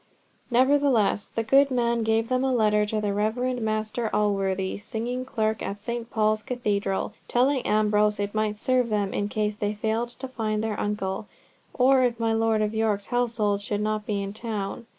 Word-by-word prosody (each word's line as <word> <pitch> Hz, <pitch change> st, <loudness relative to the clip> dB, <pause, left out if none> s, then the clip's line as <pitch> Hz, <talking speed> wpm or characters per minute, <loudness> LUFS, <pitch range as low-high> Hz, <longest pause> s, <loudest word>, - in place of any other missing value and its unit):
Nevertheless 255 Hz, -5 st, +3 dB
the 225 Hz, -, -2 dB
good 275 Hz, +5 st, +5 dB
man 235 Hz, -2 st, +1 dB
gave 225 Hz, 0 st, +1 dB
them 255 Hz, +1 st, +1 dB
a 265 Hz, -, +1 dB
letter 210 Hz, -3 st, +3 dB
to 215 Hz, 0 st, -1 dB
the 205 Hz, -1 st, -1 dB
Reverend 240 Hz, +4 st, -1 dB
Master 215 Hz, +1 st, -1 dB
Alworthy, 195 Hz, -2 st, 0 dB
singing 235 Hz, +4 st, -4 dB
clerk 220 Hz, -3 st, -1 dB
at 200 Hz, +1 st, -4 dB
St. 235 Hz, +2 st, -4 dB
Paul's 215 Hz, -1 st, +1 dB
Cathedral, 205 Hz, -5 st, -2 dB
telling 260 Hz, +2 st, +2 dB
Ambrose 210 Hz, -1 st, +2 dB
it 205 Hz, 0 st, -2 dB
might 215 Hz, -1 st, 0 dB
serve 250 Hz, +1 st, +1 dB
them 205 Hz, -2 st, 0 dB
in 205 Hz, 0 st, -1 dB
case 210 Hz, 0 st, -1 dB
they 210 Hz, 0 st, -2 dB
failed 220 Hz, +3 st, -1 dB
to 255 Hz, +2 st, -6 dB
find 220 Hz, -4 st, -2 dB
their 215 Hz, -2 st, -2 dB
uncle, 205 Hz, -1 st, -2 dB, 0.4 s
or 260 Hz, +1 st, +4 dB
if 240 Hz, -2 st, +1 dB
my 225 Hz, -1 st, +1 dB
Lord 225 Hz, -1 st, +2 dB
of 210 Hz, +1 st, -1 dB
York's 215 Hz, -2 st, 0 dB
household 225 Hz, -4 st, +1 dB
should 205 Hz, 0 st, -2 dB
not 215 Hz, +1 st, -2 dB
be 205 Hz, -3 st, -1 dB
in 195 Hz, 0 st, -5 dB
town. 220 Hz, 0 st, -5 dB
215 Hz, 180 wpm, -26 LUFS, 210-240 Hz, 0.4 s, good